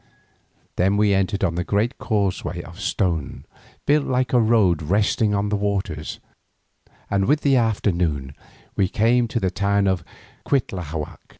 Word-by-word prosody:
Then 95 +3 +2
we 105 -1 +3
entered 95 +1 0
on 90 -3 +1
the 90 +1 -2
great 105 +7 -1
causeway 95 -5 -1
of 85 +2 -12
stone 90 -6 -2 0.4
built 150 0 +2
like 130 -1 0
a 125 - +5
road 110 -8 +3
resting 105 +5 +1
on 100 +1 0
the 105 - 0
waters, 100 -6 -3 0.9
and 100 -1 +2
with 150 +6 +2
the 140 -2 +3
afternoon 90 - 0 0.4
we 95 - +2
came 115 +5 +2
to 120 - -2
the 95 -4 0
town 100 +1 +1
of 95 -3 0 0.4
Cuitlahuac. 90 - -3
100 Hz, 145 wpm, -22 LUFS, 90-110 Hz, 0.9 s, a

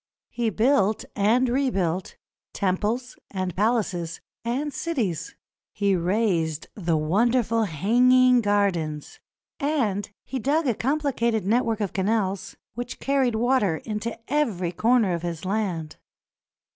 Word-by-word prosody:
He 235 -2 0
built 220 -1 +2
and 225 +6 +3
rebuilt 195 -9 0 0.4
temples 210 +7 -1
and 185 -3 -3
palaces 190 -6 0 0.2
and 270 +5 -2
cities; 235 - -2 0.4
he 200 -1 +1
raised 175 -4 0
the 170 -5 0
wonderful 225 +7 +2
Hanging 250 - +4
Gardens; 185 -8 -1 0.4
and 235 -10 0 0.2
he 265 - -4
dug 295 +7 +1
a 250 - +2
complicated 235 -5 0
network 225 +1 +1
of 200 - -2
canals 195 -1 -1 0.2
which 245 +2 -6
carried 270 -4 +1
water 225 -7 +2
into 220 +3 -4
every 220 - 0
corner 225 0 +2
of 170 - -2
his 170 0 -5
land. 185 -6 -2
215 Hz, 115 wpm, -25 LUFS, 185-245 Hz, 0.4 s, Hanging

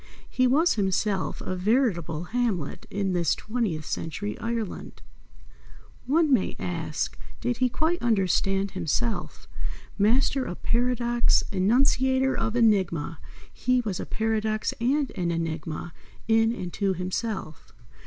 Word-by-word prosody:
He 255 0 +2
was 315 +7 +4
himself 195 -4 0
a 185 - -3
veritable 180 - +1
Hamlet 195 - -1
in 195 -1 -1
this 170 -2 +2
twentieth 215 -9 -2
century 195 +9 -3
Ireland. 230 -3 -4 1.0
One 305 +1 +3
may 220 -7 +2
ask, 165 -3 -3 0.2
did 245 -1 -1
he 255 0 +2
quite 320 +7 0
understand 195 -3 +1
himself? 190 +5 -2 0.5
Master 255 +6 +3
of 180 - -7
paradox, 240 0 +2
enunciator 260 +6 +3
of 225 0 -1
enigma, 190 -9 +2 0.3
he 250 +1 +1
was 205 -6 -3
a - - -5
paradox 220 0 0
and 275 +3 +1
an 180 -4 -2
enigma 165 0 -3 0.3
in, 225 0 +4
and 180 -7 -5
to, 195 -2 +1
himself. 185 -2 -4
215 Hz, 120 wpm, -26 LUFS, 180-245 Hz, 1.0 s, was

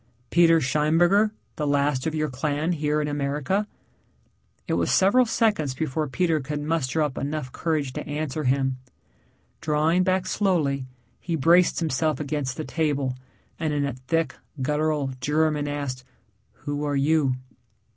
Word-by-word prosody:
"Peter 165 -1 +5
Scheinberger, 165 +9 +3 0.3
the 150 - -1
last 145 -1 +1
of 160 - -2
your 155 0 0
clan 145 +4 -1
here 150 -2 0
in 150 - -1
America." 145 +8 -1 1.0
It - - -1
was - - +1
several 235 +6 +4
seconds 205 - +1
before 155 +1 -2
Peter 165 +3 +1
could 145 +2 -4
muster 155 -1 0
up 145 -3 -2
enough 145 -2 -3
courage 150 -5 -1
to - - -6
answer 150 0 -3
him. 135 0 +1 0.8
Drawing 155 +3 +2
back 185 0 +1
slowly 160 -10 0 0.3
he 170 - -2
braced 170 +4 +4
himself 155 -2 0
against 145 -3 -3
the 155 - -4
table, 145 -5 -1 0.4
and 155 -2 -1
in 145 -1 +1
a 140 - -2
thick, 160 +6 -1 0.3
guttural 150 0 0
German 150 +1 +1
asked, 140 -3 -4 0.6
"Who 145 0 -2
are 145 -1 -1
you?" 140 -1 +2
150 Hz, 145 wpm, -25 LUFS, 140-165 Hz, 1.0 s, Peter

